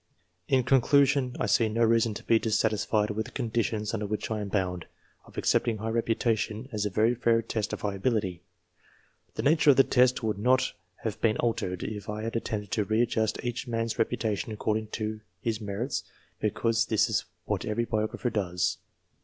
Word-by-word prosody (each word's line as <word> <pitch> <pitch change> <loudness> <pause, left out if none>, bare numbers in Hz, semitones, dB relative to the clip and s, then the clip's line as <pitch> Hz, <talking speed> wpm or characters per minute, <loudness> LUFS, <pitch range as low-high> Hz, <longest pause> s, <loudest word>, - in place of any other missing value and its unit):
In 130 -2 +3
conclusion, 135 0 +3
I - - +1
see 115 -2 +3
no 115 +2 +1
reason 115 -1 +3
to - - -7
be 115 - +4
dissatisfied 110 -1 +1
with 110 +1 -3
the - - -12
conditions 110 -3 -1
of 105 -2 -3 1.3
accepting 115 -2 +2
high 110 +2 -3
reputation 115 0 0
as 105 -2 -1
a - - -2
very 110 +5 +2
fair 115 -1 +2
test 110 -1 -2
of - - -4
high 100 -1 -1
ability. 100 -4 -1 0.9
The - - -3
nature 150 +1 +4
of 140 - +8
the 135 - +7
test 125 -2 +3
would 110 -2 -1
not 130 +4 +2 0.3
have 110 -3 -3
been 110 -2 +2
altered, 90 -6 -1
if 105 -2 -5
an 105 +1 -3
attempt 115 - -3
had - - -7
been 110 - 0
made 105 - -14
to 105 - +1
readjust 110 0 0
each 120 +2 -3
man's 115 -1 -2
reputation 110 -1 -1
according 110 0 -1
to 110 0 -4 0.2
his 110 +2 -2
merits, 105 +6 -3 0.4
because 115 +2 +1
this 110 - +3
is - - 0 0.2
what - - -1
every 115 +2 -1
biographer 110 +2 -1
does. 90 -4 -1
110 Hz, 175 wpm, -28 LUFS, 105-120 Hz, 1.3 s, of